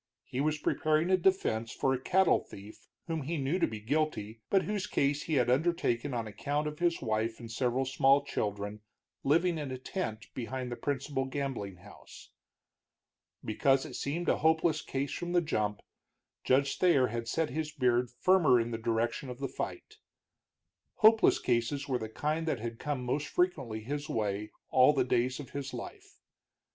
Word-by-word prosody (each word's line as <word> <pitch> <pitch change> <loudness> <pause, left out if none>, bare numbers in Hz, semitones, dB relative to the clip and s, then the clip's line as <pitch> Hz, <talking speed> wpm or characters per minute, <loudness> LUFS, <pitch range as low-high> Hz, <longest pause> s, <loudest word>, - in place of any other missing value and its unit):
He 130 +1 -3
was 155 +1 +1
preparing 155 +3 +1
a - - +7
defense 170 -12 +1
for 135 - +1
a 130 - -1
cattle 185 +5 +4
thief 100 +2 -13 0.2
whom 165 -2 -2
he 160 +5 -3
knew 145 +6 0
to - - +3
be 110 -1 -6
guilty, 115 -3 -2
but 195 -1 +3
whose 205 -2 -2
case 140 +1 +1
he 160 - -2
had 125 -3 +3
undertaken 140 -2 +1
on 120 -2 -2
account 145 +8 -2
of 150 0 -5
his 170 -3 +1
wife 110 0 -1
and 115 -2 -8
several 125 +3 0
small 135 +2 +3
children 105 -5 -3 0.4
living 165 +4 +2
in 145 -2 -4
a 130 - -4
tent 120 - -4
behind 125 0 -4
the - - -2
principal 140 0 -2
gambling 135 -8 -4
house. 90 +4 -14 1.1
Because 135 +5 +2
it - - -8
seemed 165 +5 -3
a - - +2
hopeless 160 +1 +2
case 135 +1 -3
from 175 0 -4
the 175 - +5
jump, 105 -10 -1 0.6
Judge 135 +2 +2
Thayer 170 -8 +5
had 115 +1 -4
set 160 +4 0
his 155 +2 -3
beard 125 -4 +1
firmer 155 0 +4
in 115 +1 -2
the 115 - -3
direction 115 +3 -1
of 125 - -6
the 135 +1 -3
fight. 430 - -6 1.0
Hopeless 220 0 +6
cases 125 +4 0
were 130 -3 0
the 110 - -5
kind 155 +7 -2
that 145 -6 0
had 115 0 -5
come 145 -4 -3
most 140 +4 -1
frequently 135 -13 0
his 145 +6 -4
way 105 -1 -1 0.2
all 130 +3 +6
the 135 -3 +2
days 125 +1 +1
of 140 - -9
his 135 -2 -5
life. 120 - -9
135 Hz, 175 wpm, -31 LUFS, 115-155 Hz, 1.1 s, a